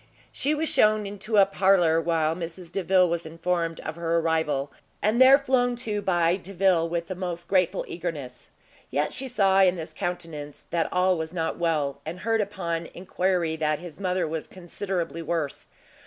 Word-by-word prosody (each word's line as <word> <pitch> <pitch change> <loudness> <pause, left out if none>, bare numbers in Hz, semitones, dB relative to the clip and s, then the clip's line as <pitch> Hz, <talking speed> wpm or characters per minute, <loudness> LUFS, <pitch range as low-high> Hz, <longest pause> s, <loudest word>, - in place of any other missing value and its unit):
She 295 +2 0
was 315 +2 -1
shewn 215 -4 +3
into 205 +2 -3
a 200 - +8
parlour, 185 -4 +3
while 160 -1 +1
Mrs 170 0 -7
Delvile 185 -1 +3
was 170 0 -2
informed 165 0 -2
of 160 +1 -6
her 170 0 0
arrival, 160 -4 0 0.3
and 220 +4 +2
there 265 +1 +9
flown 255 -3 +1
to 210 -2 -1
by 175 -2 +2
Delvile 185 -3 +1
with 170 0 -2
the 185 - -5
most 175 -2 -5
grateful 185 -3 +1
eagerness. 150 -8 -6 0.4
Yet 145 +3 -1
she 265 - -3
saw 195 -6 +3
in 185 -1 +4
his 160 -1 -7
countenance 165 -5 -5
that 170 -1 0
all 180 -1 +2
was 160 +2 -5
not 165 -2 -2
well, 150 -5 0
and 165 +4 -7
heard 225 0 +1
upon 170 -5 -3
enquiry 180 -2 0
that 155 -1 0
his 175 +1 -10
mother 185 -3 0
was 160 0 -4
considerably 180 -1 -4
worse. 160 -3 -3
175 Hz, 170 wpm, -26 LUFS, 165-195 Hz, 0.4 s, there